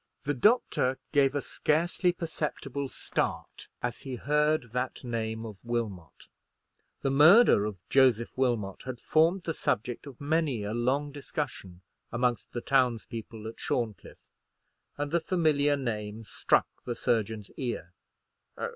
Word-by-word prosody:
The 145 - 0
doctor 135 - +3
gave 140 -2 +3
a 145 - +1
scarcely 175 +4 +1
perceptible 150 -5 -4
start - - -3 0.2
as 120 -1 -2
he 130 -2 -5
heard 150 -1 +1
that 125 +2 -3
name 115 -2 -3
of 105 -3 -8
Wilmot. 110 -8 -4 0.8
The 135 - +1
murder 155 - +7
of 105 -3 -5
Joseph 125 -4 +3
Wilmot 120 -7 0
had 130 -2 -5
formed 165 +7 +3
the 165 - -2
subject 120 0 -2
of 135 -4 -11
many 145 -6 0
a 105 +1 -3
long 135 +5 0
discussion 135 - -5 0.3
amongst 120 0 0
the 120 - -4
towns 125 -4 +2
people 110 -1 -8
at 115 - -8
Shorncliffe, 115 -4 -3 0.7
and 145 0 -3
the 170 - +3
familiar 150 -4 +2
name 110 -4 -4
struck - - +2 0.2
the 120 - -3
surgeon's 110 -3 -1
ear. 115 -10 -4
130 Hz, 135 wpm, -29 LUFS, 115-145 Hz, 0.8 s, murder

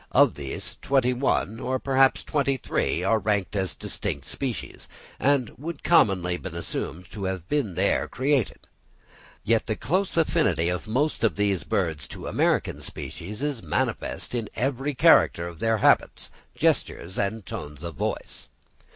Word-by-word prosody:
Of - - +6
these 70 -2 -6
twenty 130 -2 +2
one, 120 -4 0
or 130 +1 -1
perhaps 135 0 +3
twenty 140 -2 0
three, 90 -7 -1
are 110 +3 +3
ranked 105 -3 0
as 95 -6 -1
distinct 70 0 -2
species, 130 - -5 0.3
and 135 -5 +2
would 165 +4 -6
commonly 90 - +3
be 95 - -6
assumed 85 +1 -5
to 100 -2 -5
have 95 -2 -3
been 120 - -1
here - - +2
created; 135 -3 0 0.8
yet 115 0 +2
the 110 - 0
close 185 - -1
affinity 90 - +2
of 90 +4 -3
most 130 +3 0
of 115 - +3
these 100 -5 +1
birds 80 -6 -1
to - - -8
American - - +1
species 105 +9 -6
is 145 -5 -2
manifest 85 +7 -2
in 115 -4 -2
every 135 +4 -1
character 85 -7 +5
in 85 -2 -12
their 115 0 +2
habits, - - +2 0.2
gestures, 95 +3 0
and 100 +1 -1
tones 75 0 -7
of 85 -1 -4
voice. - - -4
110 Hz, 150 wpm, -26 LUFS, 90-135 Hz, 0.8 s, Of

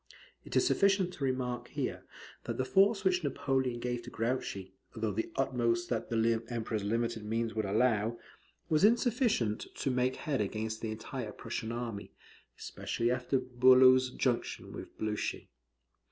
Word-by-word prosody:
It - - -8
is - - +4
sufficient 195 - +3
to 140 - -6
remark 130 -2 -1
here, - - -4 0.4
that - - -3
the 130 - 0
force 195 - +4
which 185 -2 +2
Napoleon 130 -3 0
gave 120 0 -2
to - - -9
Grouchy 110 -5 -3 0.2
(though 110 -1 -1
the 110 +3 -3
utmost 120 -3 0
that 115 -3 -2
the 115 0 +1
Emperor's 110 -3 -2
limited 115 +1 -1
means 115 +1 -1
would 110 -1 -1
allow) 110 +2 +1 0.5
was 155 0 +2
insufficient 225 - +2
to 135 - -1
make 125 +1 +1
head 140 -7 -2
against 110 +2 -3
the 110 - -3
entire 110 +1 -5
Prussian 110 +2 -5
army, 115 -4 -5 0.4
especially 120 +1 -2
after 125 +2 0
Bulow's 130 0 +6
junction 125 -1 -2
with - - -9
Blucher. 105 -1 -2
120 Hz, 150 wpm, -32 LUFS, 110-130 Hz, 0.5 s, Bulow's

